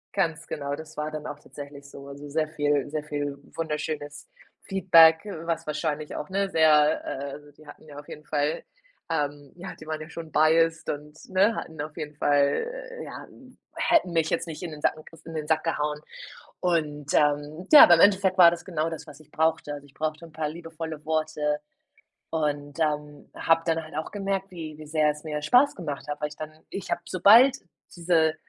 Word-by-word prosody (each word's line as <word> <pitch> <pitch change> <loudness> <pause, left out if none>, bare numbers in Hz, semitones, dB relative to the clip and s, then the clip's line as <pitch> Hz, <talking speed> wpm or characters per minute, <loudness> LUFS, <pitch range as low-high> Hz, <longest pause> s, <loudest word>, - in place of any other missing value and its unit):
Ganz 165 -4 -1
genau, 140 -1 -3
das 155 +1 -11
war 150 0 -3
dann 155 -1 -6
auch 145 - -7
tatsächlich 140 -1 -11
so. 140 0 -11
Also 140 +1 -9
sehr 155 +1 0
viel 145 -2 0
sehr 150 0 -3
viel 145 -1 -4 0.2
wunderschönes 150 -2 -4 0.3
Feedback, 165 -4 +6 0.2
was 165 -2 -3
wahrscheinlich 150 0 -3
auch, 150 - -5
ne, 195 +1 0
sehr, 155 -3 +4
äh 140 +1 -5
also, 145 0 -11
die 150 +1 -19
hatten - - -13
ja 145 -2 -11
auf 145 - -13
jeden 150 - -10
Fall, 150 +2 -1 0.5
ähm 145 -3 -2
ja, 180 - -8
die - - -13
waren 155 -1 -3
ja 155 +1 -9
schon 165 -2 -8
biased, 165 +2 +3
und 150 +1 -6
ne, 195 +4 +3
hatten 160 -2 -6
auf 155 0 -7
jeden 150 -1 -6
Fall, 145 - +2 0.4
äh - - -5
ja, - - -9 0.5
hätten 245 - +2
mich 165 -1 +1
jetzt - - -1
nicht 160 +2 -7
in 165 - -5
den 150 - -9
Sack - - +2
gek 155 - -14
in 165 - -8
den 150 -1 -4
Sack 160 +1 +1
gehauen. 150 -2 -1 0.6
Und, 150 -5 -1
ähm, 150 +4 +1
ja, 295 - +12
aber 175 - +7
im 165 - +3
Endeffekt 195 -1 +4
war 175 -3 +9
das 175 +1 -6
genau 165 -2 -1
das, 160 - -7
was 150 +1 -13
ich 150 -1 -19
brauchte. 160 -2 0
Also, 145 0 -8
ich 140 - -23
brauchte 155 +1 -3
'n 160 - -18
paar 155 -1 -3
liebevolle 165 -1 -7
Worte 155 -1 0 0.7
und, 145 -1 -2
ähm, 150 -1 -2
hab 165 0 +2
dann 165 -1 +1
halt 155 - -13
auch 155 - -3
gemerkt, 195 -1 -3
wie 160 -4 -7
wie 155 - -11
sehr 155 -1 +2
es 150 0 -7
mir 150 -2 -4
Spaß 250 - +4
gemacht 150 -5 -6
hat, 145 - -4
weil 150 - -1
ich 150 - -12
dann 155 0 -6 0.2
ich 195 - -6
hab, - - +1
sobald 230 +9 +7 0.4
diese 165 -2 +2
155 Hz, 205 wpm, -26 LUFS, 150-165 Hz, 0.7 s, ja